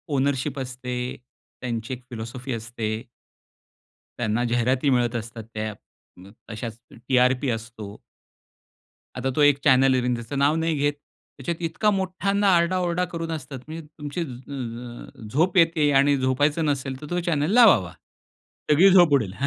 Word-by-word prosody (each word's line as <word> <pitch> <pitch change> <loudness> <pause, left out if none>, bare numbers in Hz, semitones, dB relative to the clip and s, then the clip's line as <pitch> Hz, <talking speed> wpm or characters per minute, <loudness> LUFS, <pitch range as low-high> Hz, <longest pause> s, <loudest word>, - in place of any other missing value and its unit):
Ownership 135 +1 0
असते 125 -1 -5 0.7
त्यांची 120 0 -4
एक 125 0 -8
फिलासॉफी 120 +3 -6
असते. 110 -1 -4 1.2
त्यांना 115 0 0
जाहिराती 125 +4 +1
मिळत 120 -2 +1
असतात, 115 0 -5
त्या 110 0 -3 0.5
अ, 95 +2 -14 0.2
अशाच 110 +1 -6
टी-आर-पी 125 +2 +1
असतो. 115 -3 -6 1.2
आता 130 +1 -1
तो 150 - +2
एक 145 -1 +5
चॅनल 130 -1 +5
आहे, 125 -1 +1
त्याचं 120 +4 -6
नाव 145 +2 +3
नाही 165 0 0
घेत. 145 +1 +1 0.4
त्याच्यात 165 +5 -4
इतका 165 +6 +1
मोठ्यांदा 195 +1 0
आरडा-ओरडा 175 +1 +1
करून 165 0 -4
असतात, 135 -4 -6
म्हणजे 160 0 -7
तुमची 150 +4 -4
अ, 120 -4 -7
झोप 175 +6 +2
येते 165 -3 +4
आणि 140 +1 +3
झोपायचं 145 +5 +1
नसेल 135 -2 -2
तर - - -7
तो 175 0 0
चॅनल 155 +1 0
लावावा. 185 - +6 0.8
सगळी 170 +7 +7
झोप 175 -5 +6
उडेल. 110 -9 +2
135 Hz, 140 wpm, -24 LUFS, 120-160 Hz, 1.2 s, सगळी